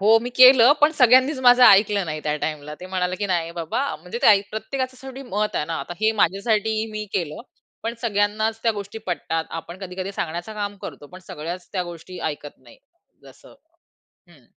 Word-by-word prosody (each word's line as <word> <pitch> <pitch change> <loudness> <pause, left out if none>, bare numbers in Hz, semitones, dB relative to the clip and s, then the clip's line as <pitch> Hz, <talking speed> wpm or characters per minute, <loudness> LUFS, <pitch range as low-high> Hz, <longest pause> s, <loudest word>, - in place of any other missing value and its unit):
हो. 220 +3 +5
मी 245 - -5
केलं 255 0 +8
पण 300 +2 +5
सगळ्यांनीच 260 +3 +5
माझं 250 0 +6
ऐकलं 200 -1 +5
नाही 155 -1 -4
त्या 150 0 0
टाईमला. 150 -1 -5
ते 185 - -8
म्हणाले, 185 -1 -2
की 205 - -3
"नाही, 170 -3 -1
बाबा," 170 - -3
म्हणजे 180 +9 -7
ते - - +4
ऐ 205 -2 +7
प्रत्येकाचं 255 +4 -4
शेवटी 265 0 -9
मत 210 -3 -2
आहे 150 - 0
ना. 165 - -4
आता 175 - -7
हे 220 0 +3
माझ्यासाठी 215 +3 0
मी 215 0 -5
केलं. 165 -6 -3 0.4
पण 230 +1 -3
सगळ्यांनाच 215 0 0
त्या 230 -1 +2
गोष्टी 205 +1 -7
पटतात. 165 -2 -2
आपण 170 +2 -7
कधी-कधी 190 0 -6
सांगण्याचं 175 +5 -5
काम 205 -1 -4
करतो. 145 - -9
पण 185 - -10
सगळ्याच 170 +4 -7
त्या 185 -2 -1
गोष्टी 175 +1 -10
ऐकत 145 0 -12
नाही 125 -2 -19 0.5
जसं - - -17 0.8
हं. 140 -8 -21
200 Hz, 190 wpm, -22 LUFS, 170-225 Hz, 0.8 s, केलं